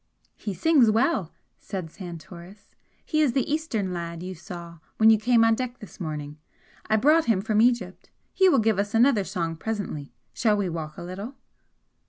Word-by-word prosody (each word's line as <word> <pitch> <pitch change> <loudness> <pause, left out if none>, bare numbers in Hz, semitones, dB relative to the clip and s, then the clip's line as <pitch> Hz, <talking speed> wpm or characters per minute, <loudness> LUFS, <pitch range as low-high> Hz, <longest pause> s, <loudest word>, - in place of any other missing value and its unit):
"He 205 -3 -5
sings 275 - +4
well!" 220 - +1 0.3
said 180 -5 -6
Santoris 175 +2 -11 0.3
"He 310 - +1
is 280 -6 +2
the 270 - +1
Eastern 265 - -2
lad 170 -1 -5
you 185 +1 -5
saw 170 -1 -10 0.2
when 220 0 +7
you 220 - +4
came 230 +1 +4
on 225 - +4
deck 250 +1 -3
this 205 -6 -13
morning. 150 -3 -5 0.5
I 215 - +4
brought 305 +8 +4
him 225 -5 +2
from 215 +1 +1
Egypt. 235 -6 0 0.2
He 380 -1 +5
will 280 - +4
give 220 -3 +2
us 205 +2 -1
another 230 -3 +4
song 170 -4 -3
presently. 190 -8 -4 0.2
Shall 215 -3 +2
we 195 -3 -1
walk 155 -2 -6
a 175 - -7
little?" 195 +9 -7
205 Hz, 180 wpm, -25 LUFS, 175-235 Hz, 0.5 s, when